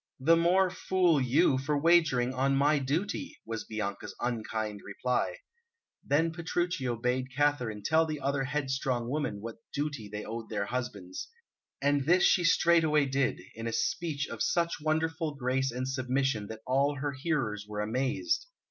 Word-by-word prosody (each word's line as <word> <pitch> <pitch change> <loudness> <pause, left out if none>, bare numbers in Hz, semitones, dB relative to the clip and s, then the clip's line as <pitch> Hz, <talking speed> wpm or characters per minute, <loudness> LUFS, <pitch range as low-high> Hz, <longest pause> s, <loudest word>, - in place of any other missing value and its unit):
"The 160 +6 +5
more 180 +3 +3
fool 180 -5 +2
you, 130 +1 +3
for 145 +2 0
wagering 150 -6 +3
on 135 +2 +1
my 145 +2 +3
duty!" 175 - -2
was 115 -1 -4
Bianca's 105 -2 -4
unkind 110 -3 -3
reply. 125 - -1 0.7
Then 160 +4 +2
Petruchio 170 -6 -1
bade 125 +2 -1
Katharine 125 -7 0
tell 160 +7 +3
the 155 -1 -3
other 135 0 0
headstrong 135 -3 -1
women 140 -9 -2
what 115 +1 -7
duty 145 -7 -3
they 105 +1 -5
owed 115 0 -6
their 105 -2 -1
husbands. 100 -6 -5 0.5
And 140 -1 +2
this 180 +2 +5
she 180 - +4
straightway 165 -3 +4
did, 135 -1 0
in 115 +1 -5
a - - -1
speech 145 +5 -1
of - - -7
such 170 -2 +1
wonderful 160 0 0
grace 130 0 0
and 125 +2 -3
submission 130 -4 0
that 110 +1 -8
all 140 +3 +2
her 140 +1 -2
hearers 130 -8 -2
were 105 0 -3
amazed. 130 - -1
135 Hz, 155 wpm, -30 LUFS, 120-155 Hz, 0.7 s, The